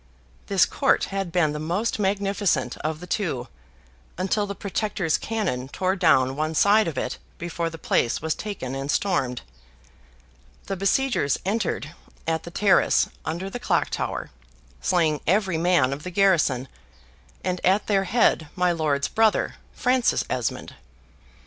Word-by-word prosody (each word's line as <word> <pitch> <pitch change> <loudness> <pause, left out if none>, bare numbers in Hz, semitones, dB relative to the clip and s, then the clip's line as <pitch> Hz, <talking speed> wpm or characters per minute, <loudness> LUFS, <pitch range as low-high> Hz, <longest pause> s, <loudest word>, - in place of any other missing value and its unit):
This - - +4
court - - +2
had 195 -3 -2
been 160 -3 +2
the 150 - -4
most 180 +10 -1
magnificent 195 - 0
of 155 +1 -3
the - - -7
two, 175 - -2 0.7
until 205 +3 0
the 200 - -5
Protector's 200 -4 -1
cannon 130 - -2
tore 185 +6 -1
down 135 -8 +3
one 155 +2 -2
side 205 +3 +5
of 155 -5 -4
it - - -3 0.2
before 170 0 -3
the 165 - -9
place 120 -6 +1
was 160 0 -1
taken 200 -12 -5
and 135 +1 -4
stormed. 135 -9 0 1.2
The 195 - -3
besiegers 195 - +1
entered 195 -6 -1 0.3
at 160 0 0
the - - -6
terrace 190 +2 +3 0.2
under 170 +4 -3
the 220 +5 -5
clock - - 0
tower, - - -3 0.5
slaying 165 -5 +1
every 190 -2 +2
man 165 -6 +3
of 140 - -6
the 180 - -6
garrison, 170 -9 +2 0.8
and 180 -1 -2
at 195 +3 +3
their 195 -2 +1
head 190 -7 +2
my 180 -1 +2
lord's 150 -4 0
brother, 220 -1 +2 0.2
Francis 250 0 +1
Esmond. 125 -3 -2
180 Hz, 145 wpm, -24 LUFS, 150-200 Hz, 1.2 s, side